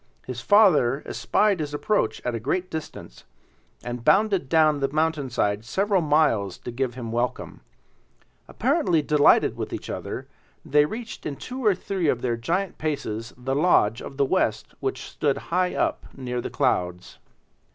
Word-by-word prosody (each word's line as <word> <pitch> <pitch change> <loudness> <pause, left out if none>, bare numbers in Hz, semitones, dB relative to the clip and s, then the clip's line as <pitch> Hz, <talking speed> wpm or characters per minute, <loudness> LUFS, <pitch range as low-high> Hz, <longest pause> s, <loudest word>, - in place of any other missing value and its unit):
His 125 -2 -6
father 155 - +4
espied 205 -4 +1
his 150 -1 -3
approach 145 - 0
at 125 - -1
a 115 - -2
great 180 +10 -2
distance, 160 -1 -8 0.6
and 120 -1 -5
bounded 195 - +3
down 155 -3 +4
the 135 - +1
mountainside 135 -9 0
several 195 - +1
miles 145 - +2
to 120 - -7
give 120 0 -2
him 120 -3 -6
welcome. 120 +2 -3 0.9
Apparently 250 - +1
delighted 145 0 +4
with - - -5
each - - -5
other, - - -5 0.4
they 150 0 +4
reached 225 +8 -6
in 145 - -4
two 255 - -7
or 210 -4 +4
three 185 -2 -2
of 125 -4 0
their 120 -2 0
giant 170 +11 -2
paces 115 -7 -3
the 130 +2 -3
lodge 135 -8 +3
of 135 - -9
the 140 - +3
West 115 - 0
which 135 -1 -3
stood 140 -2 -1 0.2
high 180 0 +1
up - - 0
near 125 -2 -3
the - - -5
clouds. 90 0 -1
145 Hz, 160 wpm, -24 LUFS, 120-180 Hz, 0.9 s, father